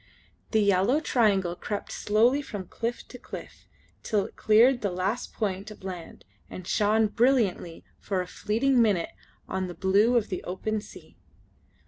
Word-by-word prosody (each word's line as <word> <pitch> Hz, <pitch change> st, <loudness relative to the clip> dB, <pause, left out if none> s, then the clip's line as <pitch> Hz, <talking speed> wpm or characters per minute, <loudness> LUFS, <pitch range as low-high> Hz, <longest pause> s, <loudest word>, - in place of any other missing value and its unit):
The 220 Hz, -, +2 dB
yellow 200 Hz, +8 st, +3 dB
triangle 200 Hz, -, +1 dB
crept 205 Hz, +3 st, -5 dB
slowly 235 Hz, +7 st, +2 dB
from 205 Hz, -9 st, -7 dB
cliff 230 Hz, +6 st, -4 dB
to 250 Hz, -, -11 dB
cliff, -, -, -10 dB, 0.3 s
till 205 Hz, -3 st, 0 dB
it -, -, -11 dB
cleared 240 Hz, +4 st, +4 dB
the 200 Hz, -, 0 dB
last 190 Hz, +6 st, -2 dB
point 200 Hz, -1 st, -3 dB
of 210 Hz, -2 st, -13 dB
land 180 Hz, -3 st, -8 dB, 0.2 s
and 185 Hz, -, -8 dB
shone 210 Hz, +4 st, +2 dB
brilliantly 215 Hz, -6 st, +1 dB, 0.2 s
for 195 Hz, -2 st, -2 dB
a 180 Hz, -, -2 dB
fleeting 235 Hz, +7 st, +1 dB
minute 200 Hz, -7 st, +2 dB, 0.4 s
on 190 Hz, -1 st, -2 dB
the 175 Hz, -, -8 dB
blue 205 Hz, +7 st, +3 dB
of 225 Hz, -, 0 dB
the 185 Hz, -, -4 dB
open 210 Hz, +4 st, -3 dB
sea. -, -, -14 dB
210 Hz, 155 wpm, -27 LUFS, 190-230 Hz, 0.4 s, cleared